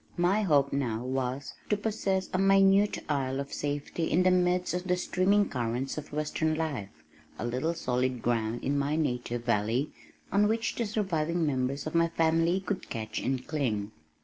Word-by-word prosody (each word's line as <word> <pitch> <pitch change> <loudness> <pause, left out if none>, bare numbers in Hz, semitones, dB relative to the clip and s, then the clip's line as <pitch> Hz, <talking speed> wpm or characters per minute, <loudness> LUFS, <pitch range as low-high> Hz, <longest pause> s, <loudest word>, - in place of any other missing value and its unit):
My 180 +5 +3
hope 145 -8 +3
now 120 -5 -1
was 130 +1 -2 0.2
to 210 - +2
possess 200 -3 -1
a 185 - +1
minute 195 +1 +4
isle 135 -2 -1
of 140 0 -5
safety 145 +3 -2
in 180 +3 +3
the 185 - +5
midst 180 0 +2
of 180 +1 -2
the 180 -1 +1
streaming 195 +3 +2
currents 125 +1 -2
of 150 -1 -7
western 155 +1 0
life 145 -11 -3 0.5
a - - -4
little 130 +8 -1
solid 125 -4 -1
ground 115 -1 0
in 140 +1 +1
my 145 +2 0
native 125 -5 -2
valley 115 +5 +1 0.4
on 205 +2 +4
which 225 +1 0
the 235 - -2
surviving 175 -5 0
members 135 0 -1
of 155 - -4
my 170 0 +4
family 165 +2 +2
could 190 -1 -4
catch 110 -1 -4
and 130 -1 -1
cling. 110 -9 -1
155 Hz, 175 wpm, -29 LUFS, 130-180 Hz, 0.5 s, the